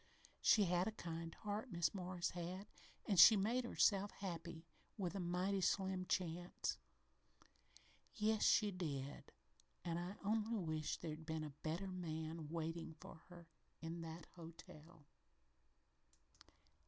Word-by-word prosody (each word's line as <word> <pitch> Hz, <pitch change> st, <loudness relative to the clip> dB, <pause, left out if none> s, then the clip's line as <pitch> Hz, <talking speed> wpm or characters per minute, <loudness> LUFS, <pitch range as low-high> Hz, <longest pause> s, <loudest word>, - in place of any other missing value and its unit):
She 210 Hz, -, +6 dB
had 180 Hz, 0 st, +2 dB
a -, -, 0 dB
kind 165 Hz, -4 st, -5 dB
heart, 210 Hz, +3 st, -4 dB
Mis' 170 Hz, -3 st, +1 dB
Morris 180 Hz, -2 st, -2 dB
had, 180 Hz, +3 st, -4 dB, 0.4 s
an' 200 Hz, -, +1 dB
she 220 Hz, +6 st, +11 dB
made 235 Hz, +6 st, +1 dB
herself 205 Hz, -3 st, +3 dB
happy 170 Hz, -4 st, -6 dB, 0.3 s
with 180 Hz, -4 st, -1 dB
a 200 Hz, -, -3 dB
mighty 185 Hz, +2 st, 0 dB
slim 190 Hz, -1 st, +1 dB
chance 175 Hz, 0 st, -1 dB, 0.7 s
" -, -, -28 dB, 0.7 s
"Yes, 215 Hz, 0 st, +2 dB
she 205 Hz, 0 st, +5 dB
did 145 Hz, -7 st, -4 dB, 0.5 s
and 170 Hz, -1 st, 0 dB
I 180 Hz, +3 st, -4 dB
only 220 Hz, +2 st, +1 dB
wish 155 Hz, -6 st, -1 dB
there'd 160 Hz, -1 st, -6 dB
been 160 Hz, -1 st, -1 dB
a 150 Hz, -, -5 dB
better 165 Hz, +5 st, -2 dB
man 160 Hz, -3 st, -4 dB
waitin' 165 Hz, 0 st, -3 dB
for 160 Hz, -, -11 dB
her 175 Hz, -2 st, -12 dB, 0.3 s
in 165 Hz, +1 st, -5 dB
that 165 Hz, 0 st, -6 dB
hotel." 165 Hz, -2 st, -12 dB
175 Hz, 130 wpm, -41 LUFS, 165-195 Hz, 0.7 s, she